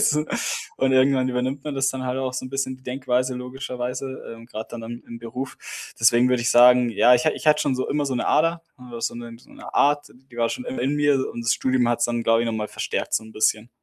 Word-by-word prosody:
so. 150 0 +2 0.5
Und 135 0 +2
irgendwann 130 0 +3
übernimmt 130 +2 -2
man 150 -2 -4
das 135 0 +1
dann 130 -1 -3
halt 125 +1 -2
auch 130 -1 -2
so 130 - -4
'n - - -8
bisschen 135 -1 -2
die 130 - -24
Denkweise 125 0 -1
logischerweise, 125 +1 -5
ähm, 115 0 -14
grade 110 -2 -7
dann 115 -1 -7
am 120 +1 -7
im 115 - -9
Beruf. 125 +3 -6 0.4
Deswegen 120 +2 +5
würde 125 -1 +1
ich 120 - +1
sagen, 125 0 +6
ja, 120 +3 +5
ich 155 +6 +1
ha - - +5
ich - - -8
hatte 150 0 +5
schon 140 - +1
so 130 - -2
immer 145 0 0
so 135 - -2
'ne 125 - -1
Ader, 165 +1 +2 0.2
w 125 -2 -9
so 115 - -2
'ne 120 -1 -8
so - - -21
'ne - - -11
Art, 145 0 +2
d - - -20 0.2
die 120 - -14
war 115 -1 +1
schon 255 - -5
immer 250 +1 -4
in 140 +2 0
mir 145 -1 +3
und 120 - -6
das 120 - +3
Studium 130 -2 +1
hat's 120 0 +1
dann, 120 -1 -2
glaube 115 0 +3
ich, - - -2
noch 115 - -1
mal 105 -1 -3
verstärkt - - -3
so - - 0
'n 110 - -13
bisschen. 110 +1 +1
125 Hz, 270 wpm, -23 LUFS, 120-135 Hz, 0.5 s, sagen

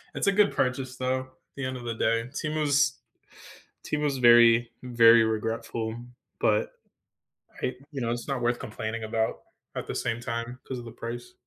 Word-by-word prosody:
it's - - -1
a - - +6
good 205 +1 +4
purchase, 130 0 -1
though, 130 0 0
at 130 - -11 0.3
the 135 - -3
end 130 0 -3
of 125 - -9
the 115 - -3
day. 115 +2 0
Temu's 150 0 +1 0.9
Temu's 150 -2 0
very, 120 -1 +6
very 115 -2 +6
regretful, 110 0 -2 0.4
but 105 0 +2 0.9
I 130 - 0 0.2
you 140 - -5
know, 115 0 -1
it's 120 0 -4
not 135 -3 -2
worth 120 0 +1
complaining 110 +1 -5
about 110 0 -1 0.3
at - - -4
the - - -4
same 120 0 -1
time 120 +1 -4
'cause 130 - -4
of 120 - -9
the 115 - -8
price. 120 +1 -7
120 Hz, 175 wpm, -27 LUFS, 115-130 Hz, 0.9 s, a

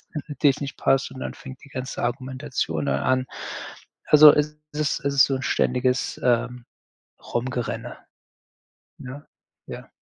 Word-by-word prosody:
was - - -33 0.3
natürlich 145 0 +2
nicht 140 -1 -5
passt 135 0 +2
und 130 - -9
dann - - -5
fängt 130 -1 -11
die - - -15
ganze 130 0 -5
Argumentation 130 - -2
dann 70 0 +1
an. 130 0 +1 0.8
Also, 150 0 +10
es 150 0 0 0.2
ist 150 0 -1
es 140 0 0
ist 135 - +7
so 135 - -1
‘n 130 - -6
ständiges, 125 0 0
ähm, 125 0 +1 0.6
rumgerenne. 120 0 -3 1.0
Ne? 135 +4 -9 0.4
Ja. - - -9
130 Hz, 145 wpm, -24 LUFS, 125-140 Hz, 1.0 s, Also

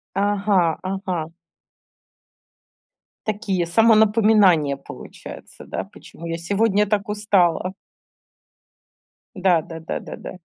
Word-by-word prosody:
Ага 200 -4 +1
ага. 185 -4 -3 2.0
Такие 205 -5 -1
самонапоминания 210 -7 +4
получаются, 140 - -11
да? - - -4
Почему 170 - -13
я 165 0 -3
сегодня 205 +4 +1
так 205 -1 -1
устала? 190 -4 +1 1.6
Да 180 -3 +3
да 165 +1 -9
да 160 - -4
да - - -9
да. 185 - -9
195 Hz, 90 wpm, -22 LUFS, 170-210 Hz, 2.0 s, самонапоминания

